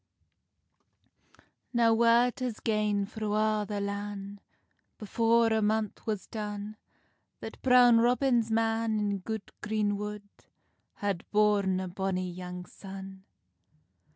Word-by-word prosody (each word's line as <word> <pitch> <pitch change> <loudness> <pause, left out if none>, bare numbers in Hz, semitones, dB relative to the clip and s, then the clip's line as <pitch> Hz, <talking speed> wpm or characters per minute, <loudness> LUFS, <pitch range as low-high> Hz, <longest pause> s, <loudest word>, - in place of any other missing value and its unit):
Now 230 -1 +4
word 235 +2 +3
has 250 -4 -3
gane 210 -2 0
thro 215 0 -4
a' 215 0 +1
the 205 -1 -3
lan, 200 0 -5 0.6
Before 230 +1 +2
a 220 - +2
month 215 0 -1
was 210 -3 -2
done, 210 -1 -6 0.6
That - - -9
Brown 245 -2 +6
Robin's 240 -1 +2
man, 225 0 +1
in 205 -1 -1
good 220 +2 -6
green 210 -1 0
wood, 210 0 -6 0.7
Had 200 -4 -3
born 205 -3 +2
a 185 - -3
bonny 185 0 -2
young 180 0 -7
son. 190 0 -10
210 Hz, 115 wpm, -29 LUFS, 200-225 Hz, 0.7 s, Brown